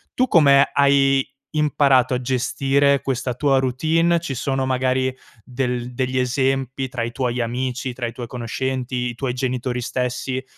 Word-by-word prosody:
Tu 255 Hz, -, +2 dB
come 140 Hz, -, +5 dB
hai 135 Hz, -1 st, +3 dB, 0.3 s
imparato 140 Hz, -4 st, +3 dB
a 125 Hz, -, -2 dB
gestire 135 Hz, +2 st, +1 dB
questa 130 Hz, -2 st, -2 dB
tua 135 Hz, 0 st, +2 dB
routine? 160 Hz, +7 st, +1 dB
Ci 160 Hz, -5 st, -5 dB
sono 135 Hz, +1 st, -1 dB
magari 130 Hz, 0 st, 0 dB, 0.3 s
del 125 Hz, -1 st, -3 dB
degli 130 Hz, +1 st, -2 dB
esempi 135 Hz, +1 st, 0 dB
tra 125 Hz, -2 st, -3 dB
i 115 Hz, -, -3 dB
tuoi 125 Hz, 0 st, -2 dB
amici, 125 Hz, +2 st, -3 dB
tra 120 Hz, -1 st, -4 dB
i -, -, -5 dB
tuoi 120 Hz, -, -6 dB
conoscenti, 125 Hz, +2 st, -4 dB
i -, -, -5 dB
tuoi 125 Hz, 0 st, -2 dB
genitori 125 Hz, -1 st, -2 dB
stessi 125 Hz, +1 st, -3 dB
130 Hz, 155 wpm, -21 LUFS, 125-135 Hz, 0.3 s, come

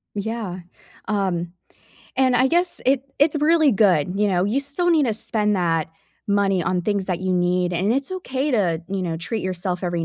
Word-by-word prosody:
Yeah, 205 Hz, -3 st, -4 dB, 0.5 s
um, 185 Hz, -5 st, -1 dB, 0.6 s
and 260 Hz, -1 st, +3 dB
I 255 Hz, +2 st, +4 dB
guess 345 Hz, +5 st, +1 dB
it 265 Hz, 0 st, +3 dB, 0.2 s
it's 295 Hz, +2 st, +3 dB
really 310 Hz, -2 st, +4 dB
good, 185 Hz, -6 st, +3 dB
you 210 Hz, 0 st, +2 dB
know, 180 Hz, -2 st, +1 dB
you 225 Hz, +7 st, 0 dB
still 285 Hz, +6 st, -1 dB
need 310 Hz, -5 st, +3 dB
to 220 Hz, -, 0 dB
spend 210 Hz, -1 st, -1 dB
that 165 Hz, -3 st, 0 dB, 0.4 s
money 200 Hz, -2 st, +2 dB
on 180 Hz, +1 st, -1 dB
things 200 Hz, 0 st, -1 dB
that 180 Hz, -3 st, -1 dB
you 185 Hz, 0 st, -1 dB
need, 180 Hz, 0 st, +1 dB
and 185 Hz, +5 st, +1 dB
it's 275 Hz, +7 st, -2 dB
okay 295 Hz, -6 st, -2 dB
to, 180 Hz, -8 st, +1 dB
you 195 Hz, -1 st, -2 dB
know, 165 Hz, -2 st, -2 dB
treat 185 Hz, +7 st, -4 dB
yourself 180 Hz, 0 st, -3 dB
every 175 Hz, -2 st, -1 dB
200 Hz, 190 wpm, -22 LUFS, 180-260 Hz, 0.6 s, I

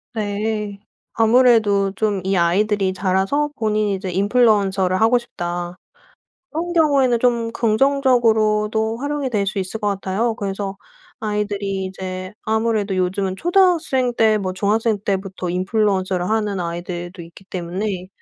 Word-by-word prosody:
네. 210 Hz, -1 st, -2 dB, 0.3 s
아무래도 225 Hz, -4 st, +4 dB
좀 205 Hz, -2 st, 0 dB
이 190 Hz, +1 st, 0 dB
아이들이 190 Hz, +2 st, +2 dB
자라서 190 Hz, +10 st, 0 dB
본인이 215 Hz, -2 st, 0 dB
이제 190 Hz, 0 st, -5 dB
인플루언서를 195 Hz, -2 st, +2 dB
하고 225 Hz, +3 st, +5 dB
싶다. 175 Hz, -5 st, -5 dB, 0.7 s
그런 335 Hz, +3 st, -3 dB
경우에는 280 Hz, -7 st, +3 dB
좀 235 Hz, -2 st, +1 dB
긍정적으로도 225 Hz, -3 st, +2 dB
활용이 285 Hz, +1 st, -2 dB
될 210 Hz, -4 st, 0 dB
수 200 Hz, 0 st, -2 dB
있을 190 Hz, +4 st, -4 dB
것 210 Hz, -, -1 dB
같아요. 200 Hz, +4 st, -1 dB
그래서 195 Hz, -2 st, -4 dB, 0.4 s
아이들이 205 Hz, -2 st, -2 dB
이제 185 Hz, 0 st, -6 dB
아무래도 220 Hz, -3 st, 0 dB
요즘은 185 Hz, +1 st, -1 dB
초등학생 330 Hz, -, +2 dB
때 220 Hz, -2 st, +4 dB
뭐 185 Hz, -2 st, -3 dB
중학생 215 Hz, +3 st, +1 dB
때부터 190 Hz, -2 st, -3 dB
인플루언서를 185 Hz, -1 st, 0 dB
하는 210 Hz, -3 st, 0 dB
아이들도 175 Hz, +1 st, -5 dB
있기 170 Hz, +3 st, -13 dB
때문에 185 Hz, +1 st, -4 dB
205 Hz, 325 characters per minute, -20 LUFS, 190-225 Hz, 0.7 s, 하고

